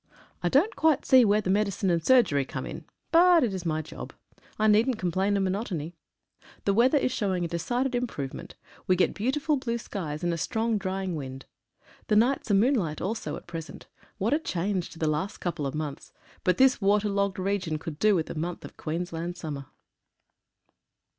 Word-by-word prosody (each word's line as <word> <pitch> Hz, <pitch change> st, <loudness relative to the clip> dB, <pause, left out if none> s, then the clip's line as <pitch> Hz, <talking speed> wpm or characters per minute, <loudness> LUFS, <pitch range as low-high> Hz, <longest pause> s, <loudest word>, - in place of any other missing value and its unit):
I -, -, +1 dB
don't 325 Hz, -, +3 dB
quite 315 Hz, -3 st, +2 dB
see 260 Hz, -2 st, +7 dB
where 210 Hz, -1 st, +3 dB
the 185 Hz, -, -1 dB
medi 205 Hz, +1 st, +2 dB
cine 195 Hz, -1 st, -1 dB
and 165 Hz, -1 st, +1 dB
surgery 200 Hz, -, +4 dB
come -, -, -6 dB
in,, -, -, -7 dB, 0.3 s
but 345 Hz, -1 st, +6 dB
it 225 Hz, -5 st, 0 dB
is 180 Hz, -2 st, -4 dB
my 155 Hz, 0 st, -1 dB
job. -, -, -9 dB, 0.4 s
I 215 Hz, -, +1 dB
needn't 220 Hz, +3 st, +4 dB
complain 190 Hz, +2 st, 0 dB
of 195 Hz, -, +1 dB
monotony. 185 Hz, -5 st, -2 dB, 0.7 s
The 200 Hz, -, +3 dB
weather 250 Hz, +7 st, +4 dB
is 255 Hz, -, +1 dB
showing 190 Hz, -7 st, -1 dB
a -, -, -1 dB
de 170 Hz, +1 st, -3 dB
cided 250 Hz, +8 st, -1 dB
improvement. 225 Hz, -, -4 dB, 0.3 s
We 185 Hz, -, +4 dB
get 180 Hz, -, +2 dB
beautiful 280 Hz, +7 st, 0 dB
blue 235 Hz, -3 st, -2 dB
skies, 165 Hz, -8 st, -5 dB
and 175 Hz, -1 st, +1 dB
a 165 Hz, -, -3 dB
strong 225 Hz, +4 st, 0 dB
drying 190 Hz, -2 st, -3 dB
wind. 135 Hz, -3 st, -7 dB, 0.6 s
The 210 Hz, -, +2 dB
nights 245 Hz, +4 st, +2 dB
are 200 Hz, -, +4 dB
moonlight 200 Hz, -, +2 dB
also 220 Hz, +4 st, -3 dB
at -, -, -10 dB
present. 165 Hz, -2 st, -8 dB, 0.3 s
What 220 Hz, +7 st, +1 dB
a 300 Hz, -, +3 dB
change 185 Hz, -, -2 dB
to -, -, -13 dB
the 160 Hz, -, -1 dB
last 155 Hz, +6 st, -1 dB
couple 160 Hz, -5 st, -3 dB
of 135 Hz, -, -5 dB
months, 150 Hz, -2 st, -5 dB, 0.3 s
but 180 Hz, -, +2 dB
this 265 Hz, -3 st, +4 dB
water 205 Hz, +1 st, +3 dB
logged 200 Hz, -1 st, 0 dB
region 185 Hz, -4 st, -1 dB
could 155 Hz, -1 st, -7 dB
do 215 Hz, -1 st, +4 dB
with 160 Hz, -3 st, 0 dB
a -, -, -6 dB
month 170 Hz, +3 st, -4 dB
of -, -, -12 dB
Queensland 170 Hz, +1 st, -4 dB
summer. 145 Hz, -5 st, -6 dB
195 Hz, 195 wpm, -27 LUFS, 165-230 Hz, 0.7 s, see